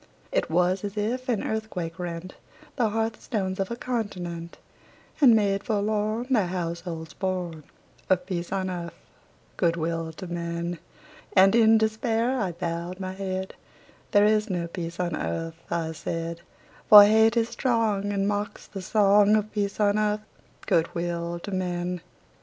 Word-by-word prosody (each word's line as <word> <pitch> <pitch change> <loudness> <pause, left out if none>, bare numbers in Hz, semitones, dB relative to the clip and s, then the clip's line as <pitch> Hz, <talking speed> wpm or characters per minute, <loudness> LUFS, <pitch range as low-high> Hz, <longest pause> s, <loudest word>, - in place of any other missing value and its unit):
It - - 0
was 180 +3 +2
as 205 +1 -5
if 250 +5 -2
an 225 -5 +1
earthquake 185 -6 -4
rent 175 +1 -5 0.4
The 235 -5 +2
hearth 225 +1 -2
stones 190 -4 -2
of 195 - -1
a 235 - -3
continent, 180 -9 -4 0.6
And 245 -5 +8
made 200 -2 +1
forlorn 215 +1 0
The 215 -8 +3
households 170 -2 -4
born 180 -5 -3 0.5
Of 180 -1 +2
peace 175 -2 -4
on 190 -1 -1
earth, 170 -1 -5 0.6
good 170 -2 +2
will 165 0 -2
to 175 - -8
men! 170 0 -4 0.5
And 195 0 +6
in 225 -1 +6
despair 225 +3 +1
I 190 -5 -1
bowed 170 +1 -4
my 185 -1 -4
head; 190 -1 -4 0.6
"There 205 0 +5
is 215 +1 +2
no 175 -2 -1
peace 170 0 -6
on 175 -1 -1
earth," 165 0 -4
I 165 -1 -1
said: 165 +1 -4 0.5
"For 210 -1 +12
hate 220 +2 +4
is 230 0 +2
strong, 220 -5 0
And 200 -1 0
mocks 205 0 -3
the 195 - -8
song 205 +1 +4
Of 215 0 0
peace 200 -1 -2
on 205 0 +3
earth, 210 0 +1 0.4
good 165 +1 +1
will 170 0 -2
to 200 - -6
men!" 180 -1 -2
190 Hz, 155 wpm, -26 LUFS, 170-215 Hz, 0.6 s, For